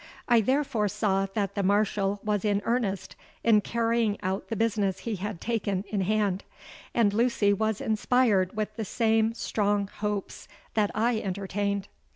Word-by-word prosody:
I 235 -2 +5
therefore 260 -2 +1
saw 195 -1 0
that 200 -3 0
the 200 - -1
Marshal 200 0 +1
was 210 -2 0
in 205 -1 +1
earnest 230 -5 -1 0.3
in 220 -2 +5
carrying 230 -2 0
out 190 +1 -2
the 225 - -3
business 205 -3 0
he 225 -3 -3
had 205 -1 -4
taken 200 -4 -1
in 205 -2 -1
hand; 200 -1 0 0.5
and 215 -4 +3
Lucy 220 -3 +3
was 220 +1 0
inspired 215 -3 +2
with 215 -1 -2
the 225 - -2
same 225 +1 +2
strong 205 -3 0
hopes 210 -2 -3 0.3
that 210 -2 +2
I 225 +1 +2
entertained. 200 0 -2
210 Hz, 155 wpm, -27 LUFS, 200-225 Hz, 0.5 s, I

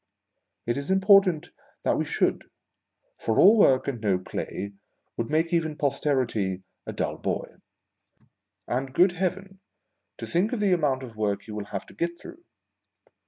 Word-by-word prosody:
It 120 +2 -1
i.s 140 +3 -4
important 190 -4 +4 0.3
that - - +2
we - - -1
should, - - 0 0.7
for 110 - -1
all 205 +4 +8
work 135 - +4
and 125 -5 -3
no 100 -4 +2
play 100 +2 -5 0.4
would 115 - -3
make 165 +3 +1
even 160 -3 +1
Posterity 130 -10 0 0.2
a - - -3
dull - - -3
boy. - - -3 1.1
A 125 +2 0
nd, 135 -1 -10
good 180 +1 +5
Heaven, 190 +2 -3 0.6
to - - -6
think 190 +8 0
of 245 - -1
the 200 -3 +3
amount 140 -6 +1
of 115 -3 -9
work 100 -2 -1
he 110 - -10
will 105 -1 -5
have 100 -1 -5
to - - -16
get 170 0 -3
through 345 0 -12
145 Hz, 165 wpm, -26 LUFS, 115-185 Hz, 1.1 s, all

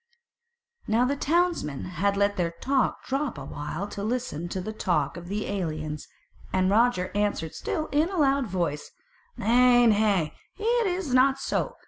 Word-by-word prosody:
Now 230 +3 +3
the 280 +3 0
townsmen 325 - 0
had 200 +3 0
let 200 0 +2
their 175 -3 0
talk 260 +11 -1
drop 270 - -2
a 135 - -7
while 150 +7 -5
to 200 - -6
listen 215 -8 -3
to 185 - -3
the 215 +4 -5
talk 170 -9 0
of 175 0 -8
the 205 +3 -2
aliens; 155 -6 -4 0.4
and 185 0 +2
Roger 220 -4 +2
answered 205 -6 -1
still 310 - -3
in 305 +4 +2
a 385 - -4
loud 275 -4 +2
voice: 170 -6 -2 0.5
"Nay, 245 +2 +5
nay, 205 -7 +3 0.2
it 460 +1 +1
is 355 -7 -2
not 265 +1 +5
so. 485 - -2
210 Hz, 160 wpm, -26 LUFS, 175-270 Hz, 0.5 s, Nay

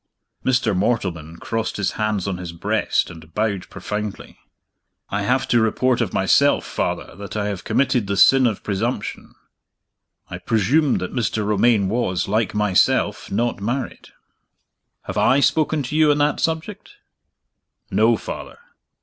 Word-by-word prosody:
Mr. 125 -5 +1
Mortleman 90 -6 -2
crossed 115 -1 -3
his 105 - 0
hands 105 -3 -2
on 95 -2 -2
his 90 -2 -7
breast 85 - 0
and 80 -1 -14
bowed 105 -3 -1
profoundly. 105 -1 -6 0.7
"I 105 - -1
have 125 +6 +1
to 120 - +4
report 125 +3 +1
of - - -1
myself, - - +3
Father, - - -3
that 100 0 -7
I 105 - -1
have 100 -3 -5
committed 125 -6 +1
the 100 0 -1
sin 130 +4 +6
of 110 -4 -3
presumption. 105 +2 -3 0.9
I - - -7
presumed 125 +7 +1
that - - -5
Mr. 110 -3 -1
Romayne 105 0 +3
was, 95 -5 -1
like 110 +2 0
myself, 105 -3 +1
not 115 +1 -1
married." 120 +6 -4 1.0
"Have - - -3
I 135 - +4
spoken 155 +1 +2
to 130 +4 -5
you 155 -1 +4
on 145 - +3
that 145 0 +1
subject?" 165 - -3 1.0
"No, - - +3
Father." - - -8
110 Hz, 145 wpm, -21 LUFS, 100-130 Hz, 1.0 s, sin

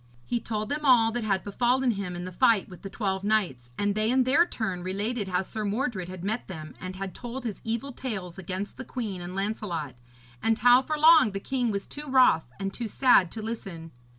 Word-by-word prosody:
He 240 - -1
told 215 -1 -3
them 295 +1 -2
all 240 -5 +5
that 240 0 -2
had 195 -3 0
befallen 245 +5 +1
him 200 -4 -4
in 175 0 -5
the 185 - -6
fight 225 0 +3
with 180 - -12
the 195 - -7
twelve 195 -2 -2
knights, 185 - 0
and 205 0 +1
they 215 +1 0
in 260 +1 +4
their 290 +8 +4
turn 190 - -3
related 200 +4 -2
how 185 0 0
Sir 215 +3 -5
Mordred 205 -3 -2
had 185 -1 -8
met 220 +5 -2
them 155 -4 -8
and 185 +1 -6
had 195 0 -5
told 245 +1 -7
his 225 -5 -5
evil 235 +4 -3
tales 195 -9 -5
against 190 +2 -5
the 260 - -6
queen 220 -8 -4
and 175 +1 -6
Lancelot, 195 - -3 0.5
and 225 0 +2
how 245 +2 +6
for 305 +3 -3
long 310 -8 +6
the 195 - -2
king 250 +2 -1
was 200 -2 -2
too 295 +1 -8
wroth 250 - +4
and 195 0 -3
too 235 - -4
sad 220 -6 +4
to 220 - -6
listen. 190 -8 -6
215 Hz, 220 wpm, -27 LUFS, 190-245 Hz, 0.5 s, how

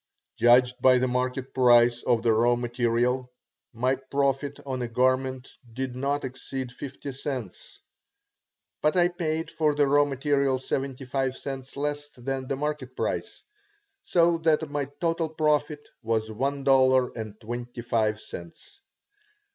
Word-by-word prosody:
Judged 125 +1 +4
by 130 0 +6
the 130 +1 +1
market 125 +1 -2
price 120 -1 +5
of 120 -2 +1
the 115 -2 +4
raw 120 +2 +3
material, 120 +1 0 0.4
my 125 +3 +1
profit 140 +1 -1
on 130 -2 -3
a 120 - -2
garment 130 +2 0 0.3
did 130 0 -4
not 140 +2 -1
exceed 130 0 -6
fifty 140 +2 -7
cents. 130 -6 -6 1.0
But 155 +4 +2
I 175 0 +5
paid 165 -2 -3
for 150 -2 +1
the 145 -1 +3
raw 145 +1 +5
material 140 -1 +1
seventy 135 0 -3
five 130 0 -1
cents 135 -1 -7
less 145 0 -3
than 130 +1 -4
the 135 - -1
market 140 -3 -4
price, - - -3 0.6
so 170 -1 +3
that 160 -2 +1
my 145 -1 -1
total 165 -1 0
profit 150 -1 0
was 110 -1 -1
one 135 +5 -2
dollar 130 -2 +4
and 110 -2 -7
twenty 120 +1 -6
five 110 -2 0
cents. 85 - -11
130 Hz, 140 wpm, -26 LUFS, 125-145 Hz, 1.0 s, by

